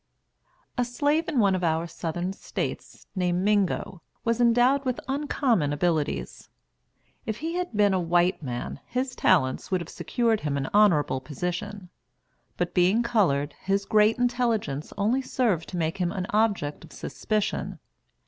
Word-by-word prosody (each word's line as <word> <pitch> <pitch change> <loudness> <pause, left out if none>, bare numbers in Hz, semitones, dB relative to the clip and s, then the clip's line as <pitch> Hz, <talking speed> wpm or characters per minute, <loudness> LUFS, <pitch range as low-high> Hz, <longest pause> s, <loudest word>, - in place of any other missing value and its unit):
A - - +4
slave 290 +7 0
in 300 - -2
one 200 -4 +4
of 185 -1 -1
our 165 0 +1
Southern 175 +2 -4
States, - - -5
named 180 -1 0
Mingo, 200 -3 0 0.2
was 230 +1 +1
endowed 245 +4 +4
with 255 -2 -1
uncommon 265 - +1
abilities. 150 0 -1 0.8
If 220 -1 -2
he 325 +4 -4
had 355 -11 -3
been 205 -2 +4
a 190 - +2
white 175 +1 +2
man, 120 -4 -5
his 255 +1 -2
talents 130 -8 +2
would 185 - +1
have 170 - -7
secured 230 -3 0
him 145 -5 -2
an 135 -1 -2
honorable 175 -10 +4
position; 180 +7 -5 0.7
but 175 -1 -1
being 190 +6 +3
colored, 155 -12 +1
his 195 +1 0
great 215 +1 +4
intelligence 235 - 0
only 225 +7 +1
served 225 -11 0
to 180 - -5
make 165 +3 -1
him 175 -1 0
an 185 -3 -3
object 205 -9 0
of - - -14
suspicion. 215 -1 -2
195 Hz, 150 wpm, -26 LUFS, 170-235 Hz, 0.8 s, A